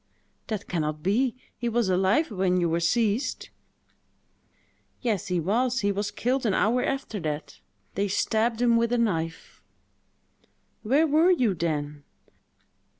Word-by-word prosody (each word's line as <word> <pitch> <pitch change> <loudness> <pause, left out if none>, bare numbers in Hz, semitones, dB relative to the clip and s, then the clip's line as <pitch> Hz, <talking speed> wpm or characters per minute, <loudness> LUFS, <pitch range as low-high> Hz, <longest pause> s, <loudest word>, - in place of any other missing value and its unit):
"That 210 -3 -4
can 170 -3 -1
not 150 0 -3
be: 235 +6 +1 0.2
he 240 -1 -1
was 235 -2 +1
alive 190 - +2
when 185 -2 +1
you 175 - +1
were 165 +1 0
seized!" 215 +7 0 1.5
"Yes, 220 -7 -1
he 180 -2 0
was; 240 +9 +1
he 200 0 +1
was 205 +1 -2
killed 250 +5 -1
an 195 - +1
hour 245 +4 +2
after 270 -6 -3
that. 155 -3 -5 0.3
They 200 +2 0
stabbed 225 +4 0
him 235 -1 +4
with 230 0 +1
a 245 - +2
knife." 165 -8 -2 1.2
"Where 275 +8 +3
were 315 +4 +4
you 255 - +3
then?" 150 -4 -3
210 Hz, 145 wpm, -26 LUFS, 180-240 Hz, 1.5 s, him